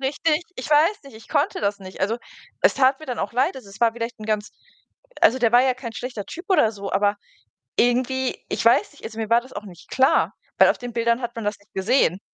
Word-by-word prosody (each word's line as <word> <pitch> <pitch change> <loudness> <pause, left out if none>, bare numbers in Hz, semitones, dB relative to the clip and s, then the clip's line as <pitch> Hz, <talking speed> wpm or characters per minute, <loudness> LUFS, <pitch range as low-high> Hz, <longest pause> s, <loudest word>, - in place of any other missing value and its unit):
richtig 300 +5 0
ich 255 - -6
weiß 310 +7 +3
nicht, 275 - -13
ich 220 - -14
konnte 290 -1 0
das 200 0 -1
nicht. 190 -1 -11
Also, 220 +5 0 0.4
es - - +4
tat 265 0 +3
mir 310 - -11
dann 250 -3 -4
auch 200 - -3
leid. 255 +3 +1
Also, 255 -6 -11
es 195 - -14
war 230 -1 +4
vielleicht 230 0 -5
ganz 215 -1 -1 0.7
also, 255 - +5
der 235 -2 +2
war 245 +1 +7
ja 260 -1 +2
kein 245 -2 -7
schlechter 240 -3 -6
Typ 345 - -8
oder 300 - +4
so, 200 -1 -7
aber 205 +1 +2 0.6
irgendwie, 255 +2 +1
ich - - -2
weiß 250 - +4
nicht, 290 - -19
also, 220 0 -7
mir 220 -1 -3
war 235 +1 +4
das 260 +2 -16
auch 210 - -7
nicht 175 -5 -14
klar, 265 +1 +3 0.2
weil - - +7
auf - - +1
den 245 -1 -7
Bildern 235 +1 +1
hat 240 -1 -5
man 230 -2 -5
das 205 0 -1
nicht 205 +1 -29
gesehen. 190 - +2
240 Hz, 245 wpm, -23 LUFS, 215-260 Hz, 0.7 s, war